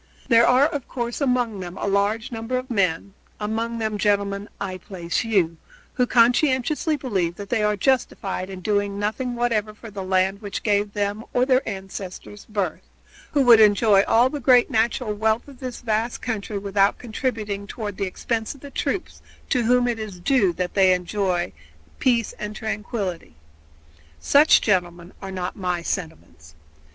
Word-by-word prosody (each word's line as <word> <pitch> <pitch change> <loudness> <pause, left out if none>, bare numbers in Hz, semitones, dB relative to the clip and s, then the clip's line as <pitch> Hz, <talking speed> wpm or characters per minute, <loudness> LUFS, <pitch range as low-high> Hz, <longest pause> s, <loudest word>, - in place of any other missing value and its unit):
There 235 -1 +6
are, 255 +3 +5
of 290 -4 -3
course, 240 +2 -4
among 245 -6 +1
them 180 -1 -7
a - - -3
large 205 +3 0
number 225 +2 -3
of 255 0 -5
men 195 -3 0 0.3
among 225 +2 -2
them, 215 -2 -2
gentlemen, 200 0 0
I 185 -2 -4
place 170 -3 -3
you 185 -7 +1 0.4
who 250 -2 +1
conscientiously 260 +6 +2
believe 190 -11 -1
that 200 +1 -8
they 235 -3 +1
are 210 0 +1
justified 205 -7 0
in 190 -1 -8
doing 205 0 0
nothing 230 +5 -2
whatever 220 -3 0
for 225 0 -11
the 200 -1 -6
land 190 +2 +1
which 205 -2 -5
gave 205 -1 +1
them 205 +1 -2
or 250 0 +3
their 260 -1 +3
ancestors 195 0 -8
birth; 200 -6 -2 0.5
who 285 - +4
would 235 -3 +8
enjoy 210 -1 +5
all 235 +3 +5
the 295 - -4
great 250 -2 +4
natural 225 0 +1
wealth 220 +3 0
of 275 -3 -14
this 255 -2 -6
vast 225 0 -1
country 215 -3 -3
without 200 0 +1
contributing 215 -4 -3
toward 205 -2 -5
the 195 - -1
expense 225 +6 -3
of 275 - -17
the 285 - -10
troops 320 +8 -3 0.3
to 250 - +3
whom 245 +1 +3
it 235 -2 -1
is 210 -4 -7
due 200 -1 +3
that 180 +1 -3
they 190 -2 +5
enjoy 180 0 -1 0.5
peace 235 -4 +1
and 210 0 -5
tranquility. 205 - -4 0.8
Such, 290 - +5
gentlemen, 175 -3 -1
are 195 - -6
not 185 -1 -4
my 180 -3 -2
sentiments. 85 - -6
210 Hz, 165 wpm, -23 LUFS, 195-240 Hz, 0.8 s, would